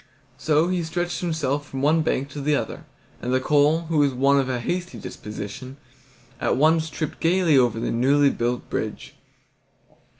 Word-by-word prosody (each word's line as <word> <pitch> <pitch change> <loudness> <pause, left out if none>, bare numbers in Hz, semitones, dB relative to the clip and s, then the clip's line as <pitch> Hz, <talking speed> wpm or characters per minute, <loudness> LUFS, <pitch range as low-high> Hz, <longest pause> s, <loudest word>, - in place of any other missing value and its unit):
So 155 +1 +2
he 180 -1 0
stretched 175 +2 -3
himself 145 -4 -2
from 135 0 -4
one 160 +3 +4
bank 140 -3 -1
to 145 0 -7
the 150 +1 +2
other, - - -4 0.4
and 125 - -3
the 130 - +3
coal, 150 +4 +3
who 165 -2 -1
was 145 -1 +3
of 135 +1 +2
a 125 -1 -1
hasty 175 +8 -3
disposition, 105 +6 -8 0.6
at - - 0
once 160 +2 +3
tripped 155 +1 -5
gaily 170 -2 +3
on 120 -3 +3
to 115 - -5
the - - -2
newly 140 +4 +3
built 120 +1 -2
bridge. - - -4
145 Hz, 170 wpm, -23 LUFS, 130-160 Hz, 0.6 s, one